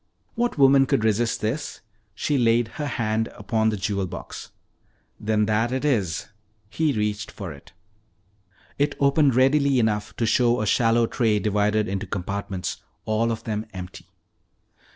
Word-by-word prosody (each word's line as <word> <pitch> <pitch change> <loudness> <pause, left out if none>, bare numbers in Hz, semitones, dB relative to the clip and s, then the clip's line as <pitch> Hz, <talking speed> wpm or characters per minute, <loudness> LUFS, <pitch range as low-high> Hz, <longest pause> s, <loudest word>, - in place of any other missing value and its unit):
"What 240 -4 -1
woman 135 -1 +5
could 110 - +1
resist 110 +1 +1
this?" 130 +8 -3 0.3
She 150 - -1
laid 120 -2 +2
her 150 - -1
hand 110 -4 -1
upon 110 -1 0
the 105 - -2
jewel 100 -1 -2
box. - - -8 0.7
"Then 105 0 +1
that 110 +3 +1
it 130 +3 -2
is." 100 - 0 0.5
He 160 +3 +1
reached 105 -4 -2
for 95 -6 -7
it. 70 - -16 1.1
It 145 +1 +1
opened 140 -1 +3
readily 135 +1 +3
enough 105 -5 0
to 115 - 0
show 120 +1 +3
a 110 - -1
shallow 115 +3 +3
tray 115 -2 +1
divided 105 +1 +1
into 95 0 -3
compartments, 100 0 -4 0.3
all 110 +2 +1
of 115 - -4
them 110 0 -3
empty. 90 0 -9
110 Hz, 150 wpm, -24 LUFS, 105-130 Hz, 1.1 s, woman